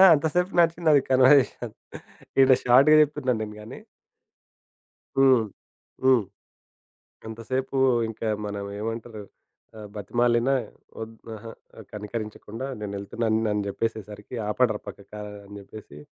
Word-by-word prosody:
ఆ! - - +9
అంత 150 +2 0
సేపు 180 +2 +1
నడిచింది 165 -4 +3
కన్వర్జేషన్. 130 -3 +4 0.7
ఈ - - +9 0.2
షార్ట్‌గా 135 +5 +6
జెప్తున్నాను 145 -5 +1
నేను 105 0 -6
గానీ 105 - -10 1.4
హ్మ్.హ్మ్. 130 0 +1 1.0
ఎంతసేపు 130 +5 -4 0.3
ఇంకా 110 0 -4 0.2
మనం 100 0 -5
ఏమంటరు, 115 0 -5 0.6
ఆహ్, 105 - -9
బతిమాలిన 120 +4 +1 0.5
ఒద్ 110 0 -7 0.2
అహా! 115 +1 -9 0.4
కనికరించకుండా 110 +3 -6
"నేనేళ్తున్నాను" 110 +2 -2
అని 105 -1 -1
జెప్పేసరికి 105 +1 -5
"ఆపండ్ర 110 -1 +1
పక్కకి" 100 +1 -11 0.3
అని 100 - -12
జెప్పేసి 100 -7 -12
115 Hz, 100 wpm, -25 LUFS, 105-130 Hz, 1.4 s, ఆ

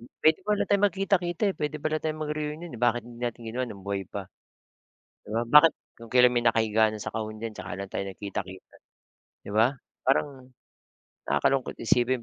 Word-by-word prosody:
m 120 - -13 0.2
Puwede 155 0 +5
pala 210 -1 +2
tayong 200 0 +3
magkita-kita, 185 -1 -1
eh, - - -21
puwede 150 +1 -2
pala 155 0 0
tayong 155 0 -3
mag-reunion, 150 +2 -4
eh. 115 - -9
Bakit 120 -1 +2
hindi 120 0 -12
natin 120 -1 -3
ginawa 120 +3 -2
no'ng 100 -4 -10
buhay 100 -1 -2
pa. 100 -1 -5 1.0
'Di - - -12
ba? 115 - +1
Bakit, 150 +5 +8 0.3
kung 115 -1 -12
kailan 125 0 +6
may 120 - +1
nakahiga 110 -1 +3
na 110 - -6
sa - - -3
kahon 110 -1 -4
diyan 115 -1 -4
'tsaka 95 -1 -7
lang 100 0 -5
tayo 100 - -3
nagkita-kita. 95 -1 -7 0.7
'Di - - -7
ba, 115 +4 +5 0.3
parang, 130 -1 0 0.8
nakakalungkot 135 -2 +1
isipin 120 +2 +1
120 Hz, 185 wpm, -27 LUFS, 110-150 Hz, 1.0 s, Bakit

